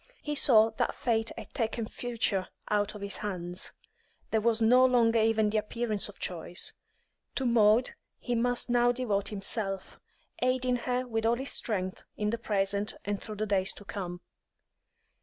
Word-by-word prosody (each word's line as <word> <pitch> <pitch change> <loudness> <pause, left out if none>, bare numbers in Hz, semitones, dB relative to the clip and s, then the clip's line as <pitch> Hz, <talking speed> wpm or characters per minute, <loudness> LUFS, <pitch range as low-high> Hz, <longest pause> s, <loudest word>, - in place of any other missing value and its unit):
He 295 - -2
saw 225 -6 +5
that - - 0
fate 225 -2 0
had - - -9
taken 230 -2 -1
the 215 - -7
future 225 -6 -1 0.2
out 210 0 +1
of 210 - -8
his 200 0 -1
hands; 180 -3 -2 0.6
there 220 - +2
was 230 0 +2
no 245 +3 +6
longer 235 -3 +4
even 220 -1 +3
the 215 - +2
appearance 215 -1 -1
of 205 - -13
choice. 175 0 -4 0.6
To 265 - +1
Maud 235 0 +4 0.3
he 245 - -3
must 245 +1 +1
now 245 0 +4
devote 215 -6 -1
himself, 195 -1 -2 0.4
aiding 255 0 +2
her 250 0 0
with 225 -2 -2
all 235 - +3
his 265 +3 -4
strength 190 -4 -2
in 210 0 0
the 230 - -2
present 200 -1 0
and 205 -1 -2
through 215 - -7
the 215 +1 -2
days 195 -2 +2
to 205 - -12
come. 180 -3 -5
220 Hz, 170 wpm, -29 LUFS, 200-240 Hz, 0.6 s, no